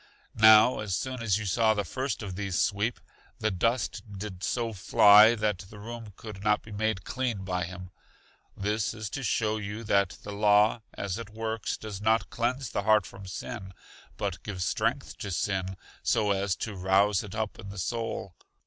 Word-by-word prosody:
Now 110 +3 +8
as 100 -4 -1
soon 130 -2 -4
as 105 -4 +2
you 110 - -4
saw 110 +3 +3
the 105 - 0
first 130 +5 -3
of 95 -3 -5
these 95 -4 -2
sweep, 110 +3 0 0.4
the 110 - 0
dust 100 0 0 0.2
did 95 -2 -7
so 115 0 -1
fly 105 +3 +7
that 105 -4 0
the 105 - -12
room 115 0 -8
could 105 -3 -9
not 105 0 +2
be 110 - -12
made 105 -2 -1
clean 120 -6 -2
by 90 -2 -1
him; 90 +1 -9 0.7
this 105 +2 -1
is 110 -2 -5
to 135 - -4
show 110 -3 0
you 105 +2 -5
that 100 -3 +1
the 105 - -6
law 105 +2 +4
as 100 +1 -3
it 115 -3 -7
works 110 0 -3
does 105 -3 -7
not 110 +1 +2
cleanse 125 +1 -1
the - - -1
heart 105 -1 +4
from 95 +3 -11
sin, 95 +1 -7 0.4
but 100 -3 -3
gives 95 -4 -4
strength - - -1
to 100 - -4
sin, 95 0 -2 0.2
so 105 -3 +2
as 100 -1 0
to 105 -3 -5
rouse 95 +2 +3
it 105 0 -8
up 110 -1 -3
in 100 - -8
the 100 - -9
soul. 115 -1 -3
105 Hz, 185 wpm, -28 LUFS, 95-110 Hz, 0.7 s, Now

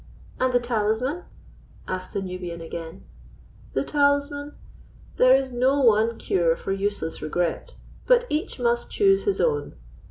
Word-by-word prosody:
"And 255 0 +2
the 245 - +3
talisman?" 240 +7 -1 0.6
asked 185 0 -4
the 195 - -2
Nubian 180 -2 -6
again. 165 0 -8 0.7
"The 135 - 0
talisman? 285 - 0 0.6
There 255 +1 +6
is 265 -1 0
no 260 +3 +2
one 225 -1 +3
cure 170 -3 +1
for - - -5
useless 195 -4 -2
regret, 175 - -2 0.3
but - - +5
each 310 - -3
must 240 0 0
choose 390 -1 +3
his 405 - 0
own. 460 -3 0
240 Hz, 135 wpm, -24 LUFS, 185-285 Hz, 0.7 s, There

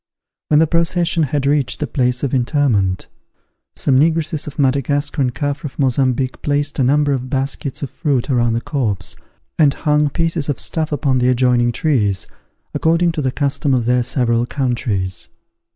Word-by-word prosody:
When 150 - +3
the 160 - +5
procession 170 +1 +1
had 145 -1 0
reached 140 -2 +1
the 150 - -1
place 125 -3 -1
of 140 - -1
interment, 120 -8 +1 0.7
some 130 -2 +2
negresses 160 0 0
of 150 - -8
Madagascar 140 +1 0
and 125 -2 +1
Caffres 145 +1 -4
of - - -29
Mozambique 130 -1 0
placed 145 0 -1
a - - +3
number 145 +2 +2
of 130 -1 -3
baskets 135 +1 -2
of 135 - -5
fruit 140 -7 -1
around 120 -4 +1
the 115 - -1
corpse, 110 - -2 0.4
and 145 -3 +4
hung 150 -1 +1
pieces 165 -1 -1
of 145 - -1
stuff 160 -2 -2
upon 140 -3 +1
the 125 0 +2
adjoining 125 -1 +2
trees, 110 - 0 0.5
according 170 +1 +2
to 160 -2 -3
the 130 -2 0
custom 140 0 0
of 120 -2 0
their 125 +1 +2
several 120 -1 0
countries. 115 -9 -2
140 Hz, 170 wpm, -18 LUFS, 125-150 Hz, 0.7 s, the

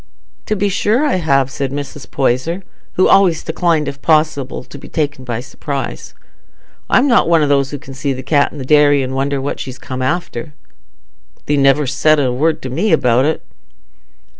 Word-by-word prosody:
"To 215 - 0
be 205 0 0
sure 215 +7 +1
I 285 - +1
have," 135 -6 +1
said 135 0 -3
Mrs. 145 0 -6
Poyser, 135 +8 -1 0.3
who 185 - +3
always 180 -5 +4
declined, 160 -2 0
if 140 0 -6
possible, 155 -4 +1
to - - -12
be - - -12
taken 145 -4 -2
by 120 -2 -4
surprise. 140 +1 -6 0.7
"I'm 260 +3 +4
not 235 -9 +3
one 165 -2 +4
o' - - +2
those 140 -1 +1
as 145 -2 -6
can 135 - -11
see 135 +1 -2
the 130 0 -5
cat 145 0 +2
i' - - -11
the 135 - -6
dairy 145 -1 +4
an' 130 0 -4
wonder 135 +1 -1
what 135 +2 -4
she's 130 -1 -6
come 130 0 -6
after." 150 -1 -3 0.9
"Thee 150 - +1
never 140 +1 +3
saidst 145 +2 +2
a 125 - 0
word 155 +6 0
to 130 - -5
me 180 +11 0
about 125 -4 +3
it." 155 - -1
145 Hz, 190 wpm, -16 LUFS, 135-160 Hz, 0.9 s, always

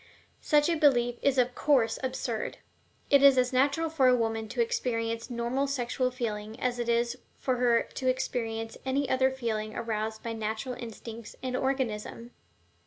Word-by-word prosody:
Such 295 -1 +3
a 340 - +2
belief 245 -6 +3
is 275 -1 +2
of 250 0 +3
course 245 -7 +2
absurd. 255 -3 -3 0.5
It 280 -1 +7
is 275 -2 +7
as 250 0 +2
natural 280 +5 +2
for 305 -5 +2
a 250 - +6
woman 225 -2 -1
to - - -6
experience 230 - -1
normal 245 +3 -1
sexual 255 -1 -1
feeling 220 -3 -4
as 245 -1 -1
it 235 0 -2
is 235 0 +1 0.2
for 255 -2 -1
her 240 -1 +3
to 260 -1 -3
experience 225 -3 -2
any 270 +1 0
other 260 0 +3
feeling 220 -5 -3
aroused 220 -1 -3
by 230 - -3
natural 220 +3 -3
instincts 230 -2 -8
and 255 -1 -2
organism. 245 -3 -2
245 Hz, 165 wpm, -29 LUFS, 230-265 Hz, 0.5 s, It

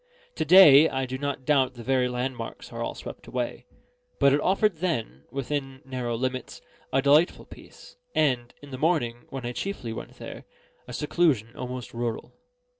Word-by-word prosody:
To - - -1
day, 160 -5 +9
I 130 0 -1
do 130 +1 -5
not 140 -2 -3
doubt 135 -3 +2
the 120 - -9
very 130 0 +2
landmarks 125 -2 -5
are - - -5
all - - -3
swept - - -9
away; - - -4 0.5
but 140 -1 +5
it 145 - +2
offered 195 -1 +2
then, 115 - -3
within 135 0 -4
narrow 125 -3 -3
limits, 130 +1 -3 0.3
a 135 0 +2
delightful 150 +5 +4
peace, - - -15 0.2
and 125 -5 +1
(in 145 - -11
the 130 - -6
morning, 130 -8 0
when 135 -2 -6
I 120 - -2
chiefly 125 - -4
went - - -8
there) - - -9 0.4
a 125 - -8
seclusion 135 -5 +1
almost 125 0 -6
rural. 115 -1 -4
130 Hz, 170 wpm, -26 LUFS, 125-150 Hz, 0.5 s, day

